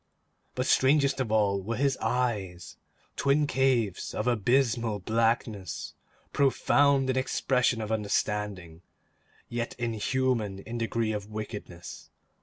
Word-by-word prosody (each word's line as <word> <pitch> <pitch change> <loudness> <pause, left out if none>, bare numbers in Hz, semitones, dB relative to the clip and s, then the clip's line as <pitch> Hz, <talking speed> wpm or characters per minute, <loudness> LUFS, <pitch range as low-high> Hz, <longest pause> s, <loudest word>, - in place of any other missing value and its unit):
But 125 - -1
strangest 140 0 +3
of 120 -5 -1
all 100 -3 +2
were 115 +5 -3
his 135 +2 +1
eyes; 105 -8 -2 0.4
twin 140 +2 +2
caves 130 -9 0
of 105 - -2
abysmal 120 -1 +1
blackness; 110 -2 -1 0.4
profound 140 0 +3
in 130 - -2
expression 125 -2 +1
of 110 0 -4
understanding, 105 -5 -2 0.7
yet 120 0 -4
inhuman 115 -2 -1
in 115 +4 -6
degree 115 -1 -1
of 105 -1 -5
wickedness. 105 -5 -8
115 Hz, 110 wpm, -28 LUFS, 105-130 Hz, 0.7 s, strangest